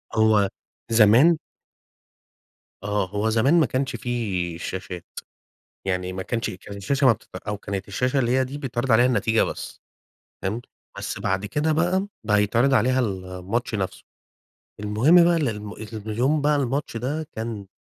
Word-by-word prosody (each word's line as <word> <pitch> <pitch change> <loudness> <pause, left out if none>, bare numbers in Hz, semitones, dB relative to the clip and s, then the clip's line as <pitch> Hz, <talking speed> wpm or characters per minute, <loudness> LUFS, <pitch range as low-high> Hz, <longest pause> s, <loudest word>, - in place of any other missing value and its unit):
هو 110 -3 +4 0.4
زمان 120 +10 +6 1.4
آه 105 -2 -1
هو 105 +2 0
زمان 130 +10 +4
ما 155 - +4
كانش 130 +3 -2
في 95 -9 -2
شاشات، 90 -1 -6 0.8
يعني 90 -1 -1
ما 95 0 -4
كانش 115 +4 -2
كانت 100 +2 -9
الشاشة 135 +7 +1
ما 120 - +8
بتت 110 - -12
أو 105 0 -5
كانت 100 -1 -5
الشاشة 125 +7 0
اللي 120 -2 +1
هي 130 +1 +3
دي 140 +3 -7
بيتعرض 125 -2 -1
عليها 120 +3 +6
النتيجة 115 -3 +2
بس، - - -5 0.6
فهمت؟ 110 +6 -3 0.3
بس - - -4
بعد 95 +2 -1
كده 150 +7 0
بقى، 180 +5 +1 0.2
بقى 105 -1 +3
بيتعرض 120 +6 +3
عليها 130 +1 +3
الماتش 95 +3 -3
نفسه. 95 -3 -3 0.8
المهم 120 +12 +5
بقى 170 0 +4
ال 145 -6 +1
الم 105 -1 -6
إن 110 0 -8 0.2
اليوم 130 +8 +1
بقى 150 0 +3
الماتش 135 -2 -1
ده 145 +6 -3
كان 110 -3 -5
115 Hz, 155 wpm, -24 LUFS, 100-135 Hz, 1.4 s, ما